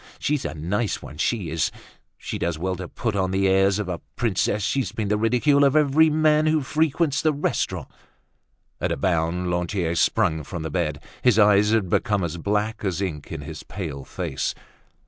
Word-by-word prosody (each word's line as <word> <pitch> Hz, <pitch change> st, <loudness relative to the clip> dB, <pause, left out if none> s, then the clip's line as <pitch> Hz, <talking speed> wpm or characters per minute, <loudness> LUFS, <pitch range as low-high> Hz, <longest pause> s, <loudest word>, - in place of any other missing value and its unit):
She's 150 Hz, -2 st, -1 dB
a -, -, -3 dB
nice 95 Hz, +7 st, -2 dB
one, 75 Hz, -, -10 dB
she 100 Hz, -4 st, 0 dB
is! 80 Hz, -1 st, +1 dB, 0.5 s
She -, -, -5 dB
does 85 Hz, -2 st, -1 dB
well 95 Hz, +3 st, -2 dB
to 90 Hz, 0 st, -6 dB
put 110 Hz, +2 st, -3 dB
on 95 Hz, -1 st, +1 dB
the 95 Hz, +1 st, +1 dB
airs 95 Hz, +1 st, +3 dB
of 105 Hz, -3 st, -3 dB
a 90 Hz, -2 st, -4 dB
princess! 105 Hz, -2 st, 0 dB
She's 135 Hz, +5 st, 0 dB
been 105 Hz, -3 st, -3 dB
the 105 Hz, -, +2 dB
ridicule 125 Hz, +6 st, +3 dB
of 140 Hz, +1 st, +4 dB
every 155 Hz, +1 st, +5 dB
man 155 Hz, 0 st, +3 dB
who 155 Hz, 0 st, +3 dB
frequents 155 Hz, +1 st, +1 dB
the 155 Hz, -, +3 dB
restaurant." 145 Hz, 0 st, -2 dB, 0.9 s
At -, -, -1 dB
a -, -, -1 dB
bound 90 Hz, +2 st, 0 dB
Lantier 90 Hz, -1 st, -1 dB
sprang 85 Hz, -1 st, +2 dB
from 80 Hz, +3 st, -6 dB
the 80 Hz, -, -4 dB
bed. 75 Hz, -5 st, -2 dB, 0.2 s
His 125 Hz, -4 st, +4 dB
eyes 105 Hz, -1 st, +5 dB
had 110 Hz, -3 st, +2 dB
become 105 Hz, +2 st, +1 dB
as 85 Hz, 0 st, -3 dB
black 105 Hz, +5 st, -1 dB
as 95 Hz, -4 st, -1 dB
ink 85 Hz, -7 st, -4 dB
in -, -, -5 dB
his -, -, -8 dB
pale 80 Hz, -9 st, -6 dB
face. -, -, -3 dB
100 Hz, 190 wpm, -24 LUFS, 85-125 Hz, 0.9 s, every